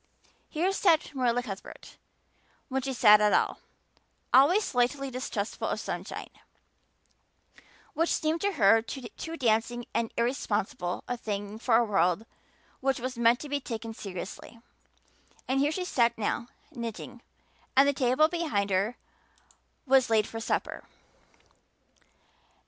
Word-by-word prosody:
Here 345 +5 0
sat 340 -6 +2
Marilla 245 -2 +1
Cuthbert, 195 -5 -9 0.7
when 265 0 -1
she 270 +1 -3
sat 210 -4 +6
at 210 0 +4
all, - - +1 0.7
always 325 +11 +6
slightly 265 0 0
distrustful 225 -5 -3
of - - -2
sunshine, - - -6 1.6
which 330 +1 +1
seemed 315 +2 0
to 405 0 0
her 225 - +5
too 265 +7 -7
dancing 235 -1 0
and 230 -1 -1
irresponsible 210 -7 -1
a 245 - -2
thing 205 -1 -5
for 230 -1 +3
a 235 - +3
world 195 0 +1 0.5
which 270 0 0
was 255 +1 -4
meant 235 +1 +3
to 295 - -6
be 285 0 0
taken 225 -3 -6
seriously; 195 +3 -8 0.9
and 265 +1 +1
here 290 +2 +2
she 365 +3 -3
sat 235 -8 +2
now, 225 +2 -2 0.2
knitting, 235 -2 -7 0.6
and 275 +1 +7
the 285 - +3
table 260 +3 +3
behind 310 - -1
her 200 +6 0 0.9
was 265 -2 +4
laid 220 -2 +3
for 225 - -7
supper. 225 - -2
240 Hz, 130 wpm, -28 LUFS, 220-275 Hz, 1.6 s, and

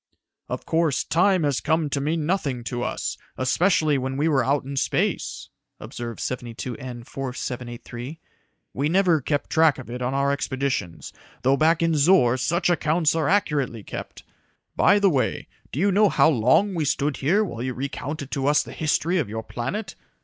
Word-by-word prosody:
"Of - - -4
course, 160 -4 +1
time 180 +1 +2
has 145 -3 0
come 160 -1 +1
to 140 - -1
mean 155 +2 -1
nothing 145 -9 -1
to 120 0 -4
us, 120 - -3 0.2
especially 155 +2 +2
when 130 +1 -3
we 145 - +1
are 140 -4 +3
out 140 +1 +1
in 140 +1 -6
space," 135 - -1 0.3
observed 120 -2 -7
72N 120 0 -5
4783. 125 +1 -6 0.5
"We 140 +3 0
never 175 -3 +3
keep 145 +2 -1
track 160 -2 +3
of 125 -3 -9
it 125 +1 -5
on 125 +2 -1
our 140 0 +2
expeditions, 130 - -3 0.3
though 135 +2 +4
back 160 +3 +3
in 165 -1 +2
Zor 145 -5 +4
such 170 +8 0
accounts 160 -2 +2
are 160 -3 0
accurately 140 - 0
kept. - - -8 0.5
By 205 - +5
the 200 -1 +4
way, 135 -4 -1 0.2
do 140 - -4
you 200 +3 +3
know 205 +2 +4
how 160 - +4
long 135 - +3
we 165 -3 -1
stood 145 0 0
here 185 +10 +2
while 120 - -5
you 130 0 -3
recounted 140 +2 -5
to 140 -1 -1
us 150 +1 +4
the - - -10
history 165 +3 0
of 130 -10 -2
your 110 +1 -4
planet? 195 - -4
140 Hz, 175 wpm, -24 LUFS, 125-165 Hz, 0.5 s, By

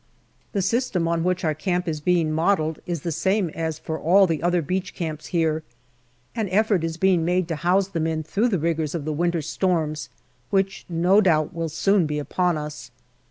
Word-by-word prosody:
The 200 -3 0
system 200 -5 0
on 165 0 0
which 180 +1 0
our 155 - +2
camp 180 +3 -2
is 155 -2 -2
being 170 -1 +2
modelled 160 -1 +1
is 170 -4 -2
the 170 - -3
same 190 +2 0
as 160 -1 -3
for 160 0 -5
all 190 +4 +5
the 165 -4 -1
other 175 0 +1
beach 185 +4 -3
camps 155 -3 -4
here. 160 -3 0 0.7
An 220 -4 -1
effort 200 -2 +2
is 165 0 -3
being 185 -2 +3
made 180 +1 +1
to 165 - -2
house 180 +4 +2
the 175 -4 -3
men 160 0 -1
through 205 +9 0
the 195 - +1
rigours 160 -1 -1
of 155 -4 -4
the 155 - -1
winter 170 +1 0
storms, 160 -2 -1 0.4
which 195 -1 0
no 180 +5 +4
doubt 155 -6 +2
will 165 -1 -3
soon 185 +2 +2
be 150 0 -2
upon 175 +3 0
us. 150 -4 -7
170 Hz, 200 wpm, -24 LUFS, 160-185 Hz, 0.7 s, all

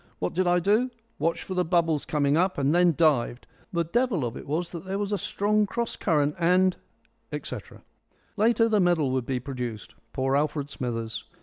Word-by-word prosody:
What 90 - -2
did 185 0 +1
I 175 0 +4
do? 210 +8 +2 0.3
Watched 165 +3 0
for 190 - -5
the 180 -1 +1
bubbles 165 -3 +1
coming 145 -1 +1
up 185 +3 +1
and 140 +1 +2
then 175 -2 +4
dived. 135 -7 +2 0.3
The 170 -1 +1
devil 210 - 0
of 120 0 -4
it - - -9
was 165 +4 -2
that 170 -2 -7
there 190 +1 -3
was 205 0 -2
a 205 - +1
strong 210 +1 +1
cross 235 +4 -2
current 150 -4 +1
and 180 +2 +3 0.3
" - - -41
etc. - - -7 0.5
Later, 225 +1 +3
the 215 -2 +2
medal 175 -7 +2
would 130 -2 -1
be 130 -2 -1
produced. 125 -5 -6 0.2
Poor 135 +1 0
Alfred 145 -1 -1
Smithers! 115 -3 -4
170 Hz, 195 wpm, -26 LUFS, 140-190 Hz, 0.5 s, I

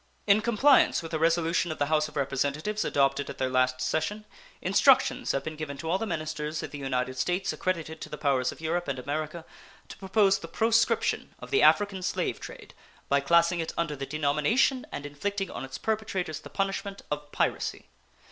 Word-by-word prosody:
In 205 +2 +5
compliance 235 -2 +4
with 165 - -8
a 160 - 0
resolution 165 +1 +2
of 155 - -5
the 145 - +1
House 155 +1 +2
of - - -14
Representatives 145 +9 -1
adopted 140 0 +1
at - - -7
their 130 -1 -1
last 130 0 +2
session, 205 +11 -1 0.3
instructions - - +3
have 135 - -1
been 155 - -5
given 150 -2 -6
to 160 - -6
all 180 +4 +1
the 225 - -2
ministers 155 -2 -3
of - - -6
the 145 - -7
United 130 -1 -2
States 180 +7 0
accredited 165 -3 -3
to - - -7
the 150 - -6
powers 135 -4 +1
of - - -12
Europe 165 +2 -2
and 140 -2 -2
America 155 +5 -4 0.4
to - - -9
propose 195 0 +2
the 165 - -8
proscription 225 +6 +1
of - - -11
the 415 - +4
African 200 -2 +4
slave - - -1
trade - - -10 0.4
by 140 - +4
classing 170 +4 +3
it 165 - -3
under 170 -3 -1
the 135 -1 -5
denomination, 155 - +1
and 145 - -5
inflicting 195 +7 -3
on - - -6
its 135 0 -6
perpetrators 195 -7 -2
the - - -11
punishment, 195 0 -3
of 150 0 -4
piracy. - - -1
160 Hz, 195 wpm, -28 LUFS, 140-195 Hz, 0.4 s, In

